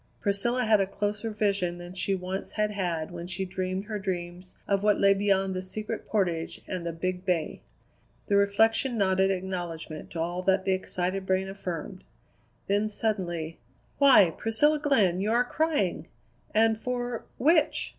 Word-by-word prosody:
Priscilla 235 Hz, +5 st, 0 dB
had 215 Hz, -2 st, +4 dB
a 195 Hz, -, +1 dB
closer 205 Hz, +3 st, -2 dB
vision 200 Hz, -5 st, 0 dB
than 175 Hz, +1 st, -9 dB
she 195 Hz, +1 st, -1 dB
once 185 Hz, +1 st, -5 dB
had 210 Hz, -1 st, 0 dB
had 175 Hz, -6 st, -2 dB
when 175 Hz, 0 st, -6 dB
she 185 Hz, +1 st, -3 dB
dreamed 185 Hz, +1 st, -3 dB
her 210 Hz, -1 st, -4 dB
dreams 180 Hz, -1 st, -5 dB
of 200 Hz, -1 st, +1 dB
what 210 Hz, -1 st, +3 dB
lay 200 Hz, 0 st, +6 dB
beyond 195 Hz, -1 st, +1 dB
the 185 Hz, -, -3 dB
Secret 210 Hz, +3 st, -5 dB
Portage 175 Hz, -6 st, -1 dB
and 185 Hz, -2 st, -4 dB
the -, -, -1 dB
Big 180 Hz, +2 st, -3 dB
Bay. 180 Hz, -5 st, -1 dB, 0.6 s
The 200 Hz, -, +1 dB
reflection 225 Hz, +5 st, +3 dB
nodded 190 Hz, -1 st, +3 dB
acknowledgment 175 Hz, -4 st, -4 dB
to 170 Hz, -, -4 dB
all 175 Hz, +2 st, -2 dB
that 190 Hz, +1 st, +2 dB
the 190 Hz, -, +2 dB
excited 185 Hz, +1 st, -2 dB
brain 190 Hz, 0 st, +1 dB
affirmed. 185 Hz, -1 st, -6 dB, 0.6 s
Then 205 Hz, +2 st, +1 dB
suddenly: 175 Hz, -7 st, -2 dB, 0.4 s
"Why, 260 Hz, -11 st, +7 dB
Priscilla 295 Hz, +8 st, +2 dB
Glenn, 210 Hz, -12 st, +2 dB
you 210 Hz, +2 st, 0 dB
are 245 Hz, +1 st, +3 dB
crying! 250 Hz, -, 0 dB, 0.4 s
And 220 Hz, 0 st, +3 dB
for 245 Hz, -1 st, -3 dB
which?" 315 Hz, +3 st, +3 dB
195 Hz, 160 wpm, -28 LUFS, 180-215 Hz, 0.6 s, Why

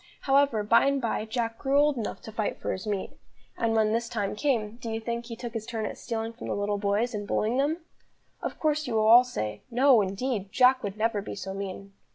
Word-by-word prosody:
However, 275 Hz, -5 st, +3 dB
by 230 Hz, +5 st, +4 dB
and 280 Hz, 0 st, +2 dB
by, 230 Hz, -3 st, -1 dB
Jack 230 Hz, 0 st, -3 dB
grew 275 Hz, +1 st, +1 dB
old 295 Hz, 0 st, +4 dB
enough 230 Hz, -4 st, -5 dB
to 220 Hz, -, -8 dB
fight 215 Hz, -1 st, -2 dB
for -, -, -2 dB
his 190 Hz, +3 st, -5 dB
meat. 200 Hz, -2 st, -2 dB, 0.4 s
And 230 Hz, -1 st, 0 dB
when 215 Hz, -1 st, +3 dB
this 230 Hz, +1 st, -1 dB
time 210 Hz, -5 st, -2 dB
came, 230 Hz, -4 st, 0 dB
do 235 Hz, -1 st, -6 dB
you 225 Hz, 0 st, -2 dB
think 235 Hz, +1 st, -4 dB
he 230 Hz, -, -6 dB
took 235 Hz, 0 st, -7 dB
his 220 Hz, -2 st, -5 dB
turn 225 Hz, -2 st, -3 dB
at -, -, -4 dB
stealing 225 Hz, -1 st, -4 dB
from 235 Hz, -, -8 dB
the -, -, -1 dB
little 205 Hz, 0 st, -1 dB
boys, 210 Hz, +4 st, 0 dB
and 205 Hz, -1 st, -4 dB
bullying 220 Hz, +5 st, 0 dB
them? 295 Hz, +4 st, +1 dB, 0.6 s
Of -, -, -4 dB
course 305 Hz, -1 st, 0 dB
you 235 Hz, -, -2 dB
will 215 Hz, -1 st, +3 dB
all 235 Hz, +3 st, +9 dB
say: 105 Hz, -, -4 dB
"No, 250 Hz, -1 st, +5 dB
indeed, 200 Hz, +1 st, -2 dB
Jack 255 Hz, +2 st, +5 dB
would 200 Hz, 0 st, -5 dB
never 220 Hz, -1 st, 0 dB
be 200 Hz, -, -6 dB
so 190 Hz, -1 st, -5 dB
mean." 195 Hz, 0 st, -6 dB
225 Hz, 235 wpm, -27 LUFS, 210-250 Hz, 0.6 s, all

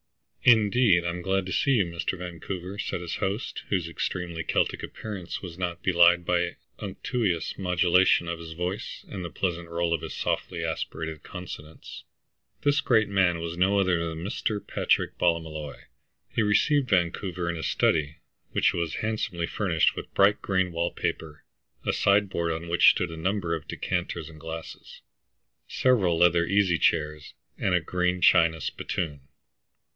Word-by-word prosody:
"Indeed, 110 Hz, -5 st, +5 dB
I'm 85 Hz, +1 st, -2 dB
glad 95 Hz, +1 st, 0 dB
to 95 Hz, -, -5 dB
see 140 Hz, -, +2 dB
you, 105 Hz, -7 st, +3 dB
Mr. 85 Hz, +2 st, -3 dB
Vancouver," 90 Hz, +2 st, -6 dB
said -, -, -3 dB
his 85 Hz, -, -4 dB
host, 100 Hz, +3 st, -3 dB
whose 90 Hz, -4 st, 0 dB
extremely 85 Hz, 0 st, -3 dB
Celtic -, -, 0 dB
appearance 100 Hz, -6 st, -6 dB
was 90 Hz, -1 st, -8 dB
not 85 Hz, -1 st, -3 dB
belied 85 Hz, -1 st, +5 dB
by 85 Hz, 0 st, 0 dB, 0.2 s
unctuous 100 Hz, -9 st, -2 dB
modulation 90 Hz, -1 st, +3 dB
of 85 Hz, 0 st, -3 dB
his 80 Hz, -1 st, -8 dB
voice, 90 Hz, +4 st, -4 dB
and 95 Hz, -3 st, -6 dB
the 85 Hz, -, -4 dB
pleasant 85 Hz, +1 st, -3 dB
roll 85 Hz, 0 st, 0 dB
of 85 Hz, -, -1 dB
his -, -, -6 dB
softly -, -, -2 dB
aspirated 80 Hz, -2 st, -4 dB
consonants. 85 Hz, -4 st, -9 dB, 0.6 s
This 145 Hz, +1 st, +3 dB
great 110 Hz, -7 st, +3 dB
man 95 Hz, -4 st, +2 dB
was 85 Hz, 0 st, -4 dB
no 95 Hz, +3 st, +2 dB
other 90 Hz, -4 st, +1 dB
than 80 Hz, +1 st, -6 dB
Mr. 105 Hz, +1 st, -2 dB
Patrick -, -, 0 dB
Ballymolloy. 80 Hz, -5 st, -1 dB, 0.6 s
He -, -, +1 dB
received 125 Hz, +6 st, +2 dB
Vancouver 90 Hz, -1 st, 0 dB
in 85 Hz, -, -1 dB
his 80 Hz, -, -3 dB
study, 75 Hz, -1 st, +1 dB, 0.3 s
which -, -, +2 dB
was 85 Hz, -2 st, -2 dB
handsomely 105 Hz, -6 st, -2 dB
furnished 85 Hz, -4 st, +1 dB
with -, -, -7 dB
bright 100 Hz, +1 st, +4 dB
green 95 Hz, -2 st, 0 dB
wall 85 Hz, +1 st, 0 dB
paper, 75 Hz, -2 st, -4 dB, 0.4 s
a -, -, +1 dB
sideboard 100 Hz, -4 st, +2 dB
on 80 Hz, +1 st, -4 dB
which 85 Hz, +1 st, +6 dB
stood 90 Hz, -2 st, 0 dB
a 80 Hz, -, -7 dB
number 90 Hz, 0 st, -1 dB
of 80 Hz, -, -4 dB
decanters 85 Hz, -3 st, -3 dB
and 80 Hz, -1 st, -13 dB
glasses, 80 Hz, +1 st, -8 dB, 0.7 s
several 100 Hz, -10 st, +2 dB
leather 85 Hz, 0 st, +4 dB
easy 100 Hz, -4 st, +2 dB
chairs, 75 Hz, -2 st, 0 dB, 0.2 s
and 90 Hz, -, +2 dB
a -, -, +4 dB
green 90 Hz, +2 st, -1 dB
china 85 Hz, -2 st, +5 dB
spittoon. 75 Hz, -4 st, -3 dB
90 Hz, 155 wpm, -27 LUFS, 85-95 Hz, 0.7 s, which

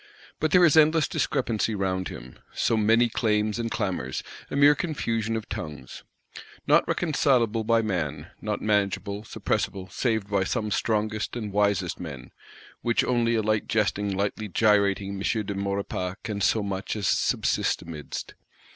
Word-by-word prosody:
But 155 Hz, -, +1 dB
there 180 Hz, +3 st, +6 dB
is 155 Hz, -, +4 dB
endless 155 Hz, 0 st, +5 dB
discrepancy 115 Hz, -5 st, 0 dB
round 95 Hz, -2 st, -1 dB
him; 65 Hz, +1 st, -10 dB, 0.2 s
so -, -, +2 dB
many 110 Hz, +2 st, +4 dB
claims 110 Hz, -1 st, 0 dB
and 115 Hz, -1 st, -1 dB
clamours; 95 Hz, -, -2 dB, 0.3 s
a -, -, -4 dB
mere 145 Hz, +1 st, +7 dB
confusion 115 Hz, -9 st, -2 dB
of 110 Hz, -1 st, -4 dB
tongues. 75 Hz, -, -7 dB, 0.6 s
Not -, -, +4 dB
reconcilable 125 Hz, -8 st, +1 dB
by 115 Hz, +1 st, +2 dB
man; 100 Hz, -5 st, -3 dB
not -, -, -2 dB
manageable, 100 Hz, -1 st, 0 dB
suppressible, 95 Hz, -3 st, -3 dB
save 110 Hz, -5 st, 0 dB
by 100 Hz, -2 st, +1 dB
some 105 Hz, +2 st, -2 dB
strongest 110 Hz, 0 st, -1 dB
and 105 Hz, -4 st, -5 dB
wisest 100 Hz, -3 st, +1 dB
men;—which 80 Hz, -, -4 dB
only 120 Hz, -2 st, +1 dB
a 110 Hz, -, +1 dB
lightly 110 Hz, 0 st, 0 dB
jesting 105 Hz, -2 st, 0 dB
lightly 100 Hz, +2 st, -2 dB
gyrating 100 Hz, -1 st, +2 dB
M. 110 Hz, -1 st, 0 dB
de 100 Hz, -, -3 dB
Maurepas 100 Hz, -2 st, -3 dB
can 105 Hz, -2 st, -4 dB
so 105 Hz, +2 st, +2 dB
much 95 Hz, 0 st, -3 dB
as 105 Hz, -3 st, -1 dB
subsist -, -, +1 dB
amidst. 80 Hz, -4 st, -7 dB
105 Hz, 145 wpm, -26 LUFS, 100-115 Hz, 0.6 s, mere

